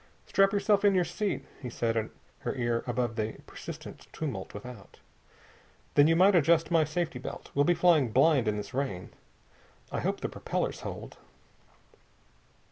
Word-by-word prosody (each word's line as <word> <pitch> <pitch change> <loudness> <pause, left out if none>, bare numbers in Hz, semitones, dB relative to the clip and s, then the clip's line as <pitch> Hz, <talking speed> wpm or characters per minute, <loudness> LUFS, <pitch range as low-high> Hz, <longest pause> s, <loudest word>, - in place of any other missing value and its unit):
"Strap 195 0 +3
yourself 205 0 +2
in 200 -1 +5
your 180 -1 +3
seat," 190 +4 -2 0.2
he 125 - -5
said 115 -1 -1
in 110 -1 -1 0.3
her - - -3
ear 120 -2 0
above 120 -2 -1
the 110 0 -1
persistent - - -9
tumult 125 -12 -5
without. 105 -1 -10 1.0
"Then 145 +1 +6
you 165 - +4
might 190 +4 +6
adjust 165 0 +3
my 165 -2 +5
safety 155 -2 -2
belt. - - -8
Well 145 +1 +3
be 175 - +3
flying 160 -9 +4
blind 135 -1 +4
in 105 0 +1
this 100 -1 -6
rain. 125 -10 -3 0.8
I - - -2
hope - - -2
the - - -1
propellers - - -3
hold." - - -7
140 Hz, 160 wpm, -29 LUFS, 115-175 Hz, 1.0 s, Then